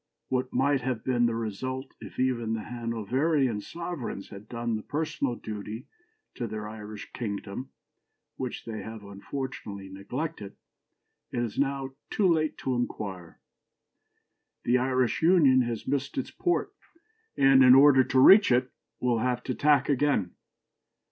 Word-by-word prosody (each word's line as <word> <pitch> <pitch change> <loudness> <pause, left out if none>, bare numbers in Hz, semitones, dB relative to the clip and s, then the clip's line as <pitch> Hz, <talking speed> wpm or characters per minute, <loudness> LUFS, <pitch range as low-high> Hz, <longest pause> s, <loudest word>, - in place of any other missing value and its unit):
What 130 0 -1
might 135 +1 +2
have 125 -3 -2
been 120 -2 +2
the 115 - -1
result 130 +5 -4
if - - -10
even 120 -3 0
the 110 - -5
Hanoverian 120 +2 0
sovereigns 165 - -6
had 100 +1 -11
done 115 -1 -2
the 110 - -3
personal 145 -2 -2
duty 110 +2 -7 0.5
to 120 - -4
their 105 -1 -5
Irish 105 -1 -9
kingdom 105 +2 -5 0.7
which 130 -2 -5
they 110 -2 -5
have 110 -1 -8
unfortunately 100 -1 -6
neglected, 100 +3 -5 0.8
it 120 - -2
is 115 0 -4
now 135 -1 -1 0.2
too 200 - +2
late 155 -3 +1
to 130 - -2
inquire. 100 -8 -4 1.2
The 125 +2 +3
Irish 130 -1 +1
Union 160 -7 +5
has 120 -3 -3
missed 140 +1 -2
its 130 - -2
port, 350 - -1 0.6
and, 135 -1 +6
in 125 0 +9
order 135 -1 +7
to 130 +1 +1
reach 195 +5 +8
it, 125 +1 +2 0.3
will 120 -2 +1
have 125 +1 -1
to 130 - -2
tack 145 0 +3
again. 140 -10 +1
125 Hz, 140 wpm, -28 LUFS, 110-135 Hz, 1.2 s, in